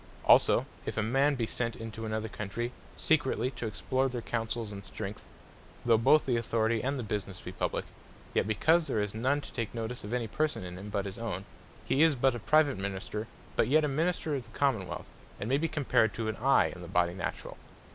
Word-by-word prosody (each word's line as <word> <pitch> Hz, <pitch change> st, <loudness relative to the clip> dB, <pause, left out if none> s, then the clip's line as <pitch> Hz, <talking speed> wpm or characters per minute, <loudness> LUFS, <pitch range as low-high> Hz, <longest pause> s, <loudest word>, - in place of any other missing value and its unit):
Also -, -, +6 dB, 0.2 s
if -, -, -3 dB
a 110 Hz, -, +2 dB
man 135 Hz, +6 st, +3 dB
be 120 Hz, -3 st, 0 dB
sent 115 Hz, +1 st, -2 dB
into 115 Hz, -1 st, -6 dB
another 110 Hz, 0 st, -2 dB
Country, 110 Hz, +3 st, -4 dB, 0.3 s
secretly 135 Hz, -4 st, +2 dB
to 120 Hz, -2 st, -4 dB
explore 130 Hz, +5 st, 0 dB
their 120 Hz, -2 st, -4 dB
counsels, 115 Hz, -1 st, -2 dB
and 100 Hz, -1 st, -7 dB
strength; 100 Hz, +1 st, -7 dB, 0.6 s
though 115 Hz, -1 st, +6 dB
both 130 Hz, +7 st, +5 dB
the 125 Hz, -3 st, +2 dB
Authority, 115 Hz, -1 st, +1 dB
and 135 Hz, +2 st, -1 dB
the 125 Hz, -, -3 dB
Businesse 100 Hz, -3 st, -4 dB
be -, -, -6 dB
Publique; -, -, -2 dB, 0.5 s
yet -, -, +2 dB
because 160 Hz, +10 st, +3 dB
there 110 Hz, -, 0 dB
is 105 Hz, -1 st, -1 dB
none 130 Hz, +6 st, +1 dB
to -, -, -11 dB
take 115 Hz, -1 st, -3 dB
notice 115 Hz, +2 st, -4 dB
of 105 Hz, -, -6 dB
any 120 Hz, -2 st, 0 dB
Person 150 Hz, +2 st, -1 dB
in 90 Hz, 0 st, -6 dB
him, 100 Hz, +2 st, -7 dB
but 100 Hz, -1 st, -1 dB
his 100 Hz, +2 st, -6 dB
own; 100 Hz, -5 st, -3 dB, 0.4 s
he 140 Hz, -, +2 dB
is 160 Hz, -2 st, +6 dB
but 130 Hz, +1 st, +3 dB
a 120 Hz, -, -4 dB
Private 145 Hz, -1 st, +3 dB
Minister; 100 Hz, +3 st, -4 dB, 0.3 s
but -, -, +3 dB
yet 155 Hz, +4 st, +4 dB
a -, -, +1 dB
Minister 160 Hz, +2 st, 0 dB
of 135 Hz, -4 st, -4 dB
the -, -, -11 dB
Common 130 Hz, -10 st, +2 dB
wealth; -, -, -6 dB, 0.3 s
and 105 Hz, -, -3 dB
may 135 Hz, +3 st, +2 dB
be 165 Hz, -, +1 dB
compared 135 Hz, -8 st, +2 dB
to 115 Hz, -1 st, -2 dB
an 110 Hz, -, -1 dB
Eye 135 Hz, +4 st, +4 dB
in 90 Hz, -, -10 dB
the 85 Hz, -, -8 dB
Body 85 Hz, -1 st, +2 dB
naturall. 95 Hz, -, -5 dB
115 Hz, 220 wpm, -30 LUFS, 105-135 Hz, 0.6 s, Also